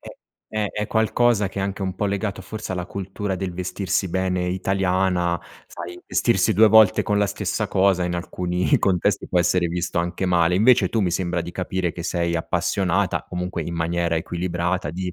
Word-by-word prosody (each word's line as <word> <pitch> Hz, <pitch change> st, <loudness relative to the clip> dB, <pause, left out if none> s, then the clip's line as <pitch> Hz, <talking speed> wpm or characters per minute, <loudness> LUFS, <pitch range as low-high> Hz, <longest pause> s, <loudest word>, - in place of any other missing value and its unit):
è -, -, -11 dB, 0.5 s
è 105 Hz, -2 st, 0 dB
è 105 Hz, 0 st, -2 dB
qualcosa 110 Hz, -2 st, +2 dB
che 100 Hz, -, -6 dB
è -, -, 0 dB
anche 100 Hz, +1 st, -3 dB
un 95 Hz, -1 st, -2 dB
po' 105 Hz, +2 st, -1 dB
legato, 100 Hz, 0 st, -2 dB
forse, 110 Hz, 0 st, -6 dB
alla 90 Hz, -1 st, -3 dB
cultura 95 Hz, +1 st, -4 dB
del 95 Hz, -1 st, -4 dB
vestirsi 90 Hz, +1 st, -2 dB
bene 90 Hz, 0 st, -1 dB
italiana. 90 Hz, -1 st, 0 dB, 0.3 s
Sai, 90 Hz, +1 st, -8 dB
vestirsi -, -, +2 dB
2 110 Hz, +2 st, +6 dB
volte 110 Hz, -2 st, +6 dB
con 105 Hz, 0 st, 0 dB
la 100 Hz, -, +3 dB
stessa -, -, -2 dB
cosa, 95 Hz, -2 st, +2 dB
in 90 Hz, 0 st, -2 dB
alcuni 90 Hz, +1 st, 0 dB
contesti, 90 Hz, -3 st, +1 dB
può 90 Hz, -, +1 dB
essere 90 Hz, 0 st, +2 dB
visto 85 Hz, 0 st, -2 dB
anche 85 Hz, +2 st, -2 dB
male. 90 Hz, -1 st, +3 dB
Invece 120 Hz, +6 st, +5 dB
tu, 115 Hz, -, 0 dB
mi 90 Hz, -4 st, +1 dB
sembra 85 Hz, -1 st, -1 dB
di 85 Hz, -, -6 dB
capire 90 Hz, -1 st, -2 dB
che 85 Hz, -, -7 dB
sei 85 Hz, -1 st, -1 dB
appassionata, 95 Hz, +3 st, 0 dB
comunque 90 Hz, -1 st, -3 dB
in 85 Hz, +2 st, -5 dB
maniera 85 Hz, 0 st, 0 dB
equilibrata, 85 Hz, 0 st, -2 dB
di 90 Hz, +1 st, -4 dB
90 Hz, 185 wpm, -23 LUFS, 85-100 Hz, 0.5 s, 2